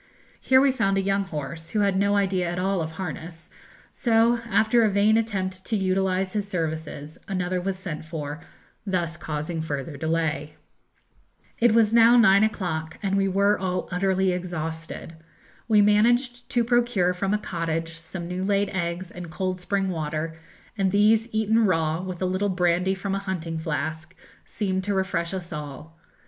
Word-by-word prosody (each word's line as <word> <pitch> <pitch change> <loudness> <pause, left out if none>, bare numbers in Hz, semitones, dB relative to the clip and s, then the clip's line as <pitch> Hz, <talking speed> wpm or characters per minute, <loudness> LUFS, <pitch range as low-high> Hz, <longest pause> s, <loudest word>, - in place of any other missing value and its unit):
Here 260 0 +5
we 275 0 +4
found 195 -7 +1
a - - +2
young 195 0 +1
horse, 160 -1 -6
who 215 - 0
had 200 -2 +2
no 200 +1 +2
idea 190 -3 +1
at 175 - -3
all 190 0 0
of 160 0 -4
harness; 165 -1 -7 0.4
so 230 0 +3
after 220 +3 +3
a 220 - +4
vain 205 +2 +3
attempt 190 -4 -1
to 225 - 0
utilise 190 -1 0
his 205 -2 -2
services, 160 -4 -4
another 185 -1 -1
was 190 +1 -2
sent 175 -6 -6
for, 155 -1 -6 0.4
thus 175 -5 -1
causing 160 0 -4
further 145 -1 -4
delay. 160 -1 -1 1.0
It 235 -1 +4
was 225 -1 +4
now 235 +1 +7
nine 200 -3 +6
o'clock, 170 -7 -2
and 195 -1 +1
we 195 0 +2
were 200 +2 +2
all 185 -1 -2
utterly 190 +1 +1
exhausted. 165 -2 -5 0.5
We 210 -2 +5
managed 240 +4 +2
to 240 -3 +2
procure 235 -6 +2
from 195 +2 -2
a 210 - +3
cottage 165 -4 -3
some 165 +2 -7
new 180 +1 -3
laid 200 0 +1
eggs 175 0 -3
and 175 -1 -8
cold 185 +1 -3
spring 195 +1 0
water, 155 -1 -3 0.4
and 195 -3 +1
these 215 +3 +4
eaten 220 0 +2
raw, 165 -2 +1
with 185 -1 -5
a - - +2
little 185 +2 0
brandy 180 +1 +1
from 195 +1 -3
a 195 - 0
hunting 170 -4 -4
flask, 160 0 -4 0.3
seemed 190 -3 -2
to 205 -1 0
refresh 175 -3 -1
us 180 -3 -5
all. 150 +1 -8
185 Hz, 170 wpm, -25 LUFS, 165-200 Hz, 1.0 s, now